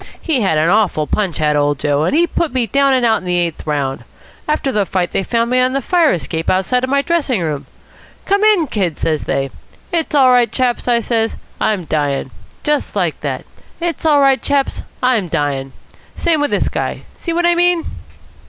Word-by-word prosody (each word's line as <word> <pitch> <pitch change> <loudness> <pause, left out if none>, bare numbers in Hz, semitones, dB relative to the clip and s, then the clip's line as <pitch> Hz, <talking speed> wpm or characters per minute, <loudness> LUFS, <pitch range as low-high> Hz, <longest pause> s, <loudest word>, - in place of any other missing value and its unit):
He 300 -7 0
had 190 -6 +1
an 155 +2 +2
awful 185 -5 +2
punch, 190 +1 -1
had 150 -1 +1
old 145 0 +1
Joe, 145 +2 0
and 230 - 0
he 340 +2 +4
put 335 -5 -2
me 250 -2 +2
down 275 +5 +2
and 250 -2 +2
out 225 -1 +3
in - - -15
the 180 -1 -1
eighth 170 -2 -2
round. 140 -3 -2 0.4
After 300 -3 0
the 210 -4 +1
fight 185 -2 -1
they - - 0
found 230 +4 0
me 255 - +3
on 255 +1 +2
the 275 - +1
fire 335 +3 +2
escape 160 +1 -2
outside 250 +8 +1
my 280 +1 +2
dressing 295 - 0
room. 155 -4 -3 0.6
'Come 400 +1 +2
in, 420 -6 +4
Kid,' 190 - -2
says 155 -2 -1
they. 135 0 -1 0.4
'It's 325 -3 -1
all 265 -3 +6
right, 245 -3 +3
chaps,' 250 -1 -1
I 235 -1 +3
says, 225 -1 -1 0.2
'I'm 200 -5 0
dying.' 145 -4 -1 0.6
Like - - -1
that. - - -4 0.3
'It's 340 -1 -3
all 300 -3 +4
right, 270 -1 +4
chaps, 280 -1 0 0.2
I'm 240 -7 +2
dying.' 145 -5 -2 0.4
Same 325 -3 +1
with 290 - +1
this - - 0
guy. - - -3 0.2
See 340 - -3
what 345 +1 +1
I 345 - +5
mean?" 350 -1 +2
235 Hz, 200 wpm, -17 LUFS, -, 0.6 s, all